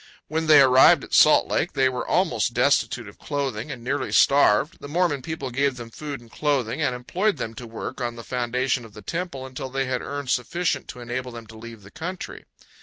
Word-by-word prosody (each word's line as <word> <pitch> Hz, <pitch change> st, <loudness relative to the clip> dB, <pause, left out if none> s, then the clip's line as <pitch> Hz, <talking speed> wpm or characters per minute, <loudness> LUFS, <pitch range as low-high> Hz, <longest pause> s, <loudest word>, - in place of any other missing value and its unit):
When 160 Hz, +1 st, -2 dB
they 155 Hz, -2 st, +8 dB
arrived 130 Hz, 0 st, +6 dB
at -, -, -11 dB
Salt -, -, +6 dB
Lake -, -, -1 dB
they 135 Hz, -1 st, +3 dB
were 125 Hz, -1 st, -3 dB
almost 120 Hz, -, +1 dB
destitute 125 Hz, -2 st, +1 dB
of 105 Hz, -, -14 dB
clothing 140 Hz, -4 st, -3 dB
and 125 Hz, -5 st, -7 dB
nearly 130 Hz, +2 st, -2 dB
starved. 140 Hz, -, +4 dB
The -, -, -9 dB
Mormon 160 Hz, -2 st, 0 dB
people 140 Hz, -3 st, -5 dB
gave 135 Hz, +1 st, 0 dB
them 115 Hz, -1 st, -9 dB
food 145 Hz, +1 st, -6 dB
and 115 Hz, -2 st, -18 dB
clothing 140 Hz, -3 st, -1 dB
and 130 Hz, -4 st, +1 dB
employed 180 Hz, +10 st, -1 dB
them 115 Hz, -3 st, -4 dB
to 120 Hz, +1 st, -9 dB
work 115 Hz, +3 st, -7 dB
on 120 Hz, -1 st, -2 dB
the 115 Hz, -, -9 dB
foundation 125 Hz, +1 st, -1 dB
of 115 Hz, -2 st, -14 dB
the 105 Hz, -, -11 dB
Temple 165 Hz, -6 st, -4 dB
until 130 Hz, 0 st, -6 dB
they 135 Hz, +1 st, -1 dB
had 130 Hz, -1 st, -2 dB
earned 145 Hz, -2 st, -4 dB
sufficient 165 Hz, +9 st, -1 dB
to 125 Hz, -, -9 dB
enable 125 Hz, +1 st, -4 dB
them 115 Hz, -1 st, -9 dB
to 110 Hz, 0 st, -14 dB
leave 115 Hz, -1 st, -11 dB
the 100 Hz, -, -14 dB
country. 180 Hz, +5 st, -7 dB
130 Hz, 215 wpm, -24 LUFS, 120-145 Hz, -, they